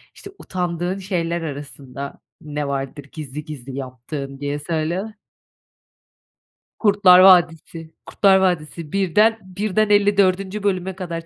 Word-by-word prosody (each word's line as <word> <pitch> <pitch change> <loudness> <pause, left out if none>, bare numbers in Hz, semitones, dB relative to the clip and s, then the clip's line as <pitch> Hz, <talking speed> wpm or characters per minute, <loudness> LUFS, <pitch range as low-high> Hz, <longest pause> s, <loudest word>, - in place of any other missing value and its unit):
İşte, 400 - -11
utandığın 180 0 -3
şeyler 170 -3 -2
arasında 140 -2 -7 0.2
ne 150 -1 -4
vardır 140 +1 -4
gizli 150 -1 -7
gizli 135 -3 -8
yaptığın, 135 +1 -7
diye 145 +1 -3
söyle. 170 +7 -3 1.7
Kurtlar 200 -4 +6
Vadisi 165 -3 +4
Kurtlar 195 -2 +4
Vadisi 170 -4 -1
birden 210 +4 +2
birden 205 +3 -1
54. 200 -1 +2
bölüme 190 -2 -1
kadar. 170 -3 -6
170 Hz, 105 wpm, -21 LUFS, 150-190 Hz, 1.7 s, Kurtlar